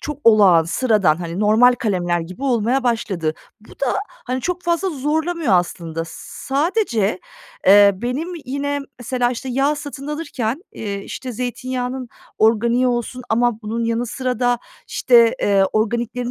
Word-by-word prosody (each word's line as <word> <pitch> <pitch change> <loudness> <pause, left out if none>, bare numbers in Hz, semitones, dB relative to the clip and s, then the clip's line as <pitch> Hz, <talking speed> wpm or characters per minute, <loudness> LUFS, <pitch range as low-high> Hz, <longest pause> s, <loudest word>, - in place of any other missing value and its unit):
çok 300 -2 -5
olağan, 200 -7 +6
sıradan, 175 -5 +1
normal 220 +4 +5
kalemler 175 -7 -1
gibi 185 +10 -9
olmaya 250 0 +1
başladı. 190 -9 -1 0.3
Bu 215 - -18
da, 275 - -3 0.2
hani, 255 - -5
çok 360 +5 -3
fazla 345 +2 0
zorlamıyor 310 - -1
aslında. 165 -2 -1
S 160 - -11 0.4
sadece, 270 - +1 0.5
eee, 200 +1 +8
benim 250 - -3 0.2
yine 285 +2 -2 0.2
mesela, 245 0 0
işte, 255 +2 -5
yağ 275 +4 +1
satın 285 -1 -7
alırken, 295 -3 -3
eee, 200 -2 -5
işte, 255 -2 -6
zeytinyağının 250 +1 -4 0.3
organiği 235 +3 +3
olsun 245 +1 -2
ama 230 0 +1
bunun 230 +2 -2
yanı 230 +1 -1
sıra 255 0 -3
da, 245 -1 +2 0.3
işte, 235 -2 +4
eee, 195 -1 +4
organiklerin 235 +3 -1
240 Hz, 140 wpm, -20 LUFS, 210-265 Hz, 0.5 s, eee